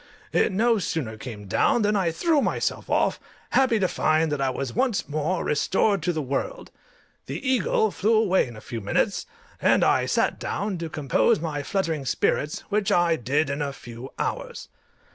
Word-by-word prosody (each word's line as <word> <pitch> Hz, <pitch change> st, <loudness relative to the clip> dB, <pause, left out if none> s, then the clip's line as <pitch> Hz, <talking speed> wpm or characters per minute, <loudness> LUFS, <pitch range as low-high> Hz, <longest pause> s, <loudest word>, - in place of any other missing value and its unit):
It -, -, +3 dB
no 225 Hz, +3 st, +2 dB
sooner 150 Hz, -, -3 dB
came 110 Hz, -2 st, -8 dB
down 210 Hz, -, +2 dB
than 210 Hz, +1 st, +2 dB
I 190 Hz, -4 st, +2 dB
threw 310 Hz, -, +2 dB
myself -, -, -1 dB
off, -, -, +1 dB, 0.3 s
happy 260 Hz, -4 st, +3 dB
to 190 Hz, -3 st, +2 dB
find 155 Hz, -2 st, +1 dB
that 145 Hz, -2 st, -1 dB
I 135 Hz, -, +2 dB
was 130 Hz, -1 st, -4 dB
once 255 Hz, -6 st, 0 dB
more 155 Hz, +4 st, -1 dB
restored 190 Hz, +6 st, +1 dB
to 175 Hz, +3 st, 0 dB
the 160 Hz, -3 st, -2 dB
world. 140 Hz, -, -3 dB, 0.6 s
The 275 Hz, -, -5 dB
eagle 245 Hz, -4 st, +2 dB
flew 220 Hz, +4 st, +1 dB
away 195 Hz, -8 st, +3 dB
in 120 Hz, -, -10 dB
a 110 Hz, -, -10 dB
few 115 Hz, -2 st, -6 dB
minutes, 100 Hz, -, 0 dB, 0.3 s
and -, -, +4 dB
I -, -, +3 dB
sat -, -, +1 dB
down 200 Hz, -3 st, -3 dB
to 165 Hz, -1 st, -4 dB
compose 140 Hz, -7 st, +2 dB
my 155 Hz, -3 st, -3 dB
fluttering 165 Hz, -4 st, -2 dB
spirits, 150 Hz, +4 st, 0 dB
which 210 Hz, -1 st, +1 dB
I 175 Hz, -1 st, +3 dB
did 145 Hz, +3 st, 0 dB
in 140 Hz, +1 st, -3 dB
a 140 Hz, -1 st, -1 dB
few 120 Hz, 0 st, -10 dB
hours. -, -, -4 dB
160 Hz, 180 wpm, -25 LUFS, 140-205 Hz, 0.6 s, and